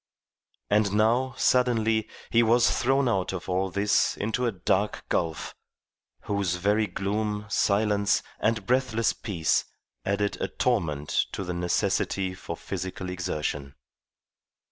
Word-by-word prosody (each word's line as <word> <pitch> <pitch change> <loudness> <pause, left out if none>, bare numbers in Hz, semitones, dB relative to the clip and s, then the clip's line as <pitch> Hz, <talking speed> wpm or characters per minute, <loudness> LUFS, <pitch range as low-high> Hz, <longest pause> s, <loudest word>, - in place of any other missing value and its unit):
And 105 -1 +3
now, 120 +5 +2
suddenly, 115 -4 +2 0.2
he 115 - +5
was 120 +1 +4
thrown 135 +1 +2
out 95 -5 0
of 90 - -6
all 95 +1 0
this 100 +3 +2
into 115 +4 -1
a - - +1
dark 100 +1 -1
gulf, 80 -3 -1 0.7
whose 100 -4 -1
very 105 +4 +1
gloom, 105 +1 -2
silence, 100 -1 +2 0.2
and 110 -2 0
breathless 120 -2 +1
peace 85 -7 0 0.4
added 100 +1 -1
a - - 0
torment 75 -3 0
to 100 - -3
the 90 -1 -3
necessity 95 +1 0
for 95 - -7
physical 95 0 -5
exertion. 75 -6 -3
100 Hz, 120 wpm, -27 LUFS, 95-110 Hz, 0.7 s, he